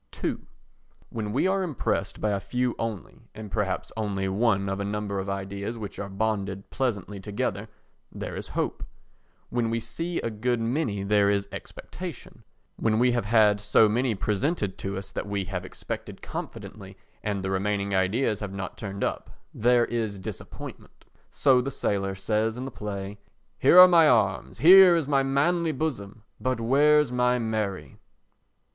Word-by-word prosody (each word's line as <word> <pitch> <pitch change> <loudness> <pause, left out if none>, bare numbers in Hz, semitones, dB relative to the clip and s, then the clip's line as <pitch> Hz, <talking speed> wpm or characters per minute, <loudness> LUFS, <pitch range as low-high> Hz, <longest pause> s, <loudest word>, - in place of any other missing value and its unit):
ii - - +1 0.8
When 105 -2 -3
we 130 +10 +1
are 190 +1 +2
impressed 170 -7 -2
by 105 - 0
a 100 - 0
few 125 +5 -1
only, 110 -6 -5 0.2
or 110 -1 -7
perhaps 100 -2 -2
only 100 -3 -2
one 100 0 +1
of 95 0 -2
a - - -1
number 100 -1 -3
of 95 +1 -4
ideas 100 +3 -4
which 105 -3 -7
are 100 - -4
bonded 100 -1 -2
pleasantly 105 -6 -2
together, 100 +1 -3 0.4
there - - -6
is - - -6
hope; - - -1 0.7
when 120 -2 0
we 115 0 0
see 165 +10 -4
a 115 - -3
good 120 +3 -1
many 115 -4 -1
there 100 0 +3
is 100 0 0
expectation; - - -9 0.3
when 110 -1 +1
we 125 +2 +4
have 120 -3 0
had 105 -2 +4
so 105 +1 +5
many 120 +2 +1
presented 100 - -1
to 95 0 -4
us 95 0 -7
that 100 - -4
we 100 -1 -2
have 90 -1 -4
expected 95 - -7
confidently - - -8 0.2
and 100 -2 -2
the 95 - -2
remaining 100 +1 -1
ideas 105 +4 +1
have 105 -2 -5
not 95 -2 -6
turned 100 -2 -5
up, - - -2 0.2
there 120 +1 +3
is 110 -4 -2
disappointment. 95 - -9 0.2
So 130 -3 +3
the 135 - -3
sailor 100 -7 -1
says 110 +3 0
in 130 - -4
the 135 - -6
play: 105 -2 -6 0.4
"Here - - +6
are 180 - +12
my 165 -3 +6
arms, 105 -5 +1
here 185 +2 +9
is 160 -5 0
my 140 -2 +3
manly 160 +5 +1
bosom, 115 -8 -4 0.2
but 130 +2 -1
where's 145 +4 +4
my 125 0 +2
Mary?" 110 -4 -3
110 Hz, 165 wpm, -26 LUFS, 100-125 Hz, 0.8 s, are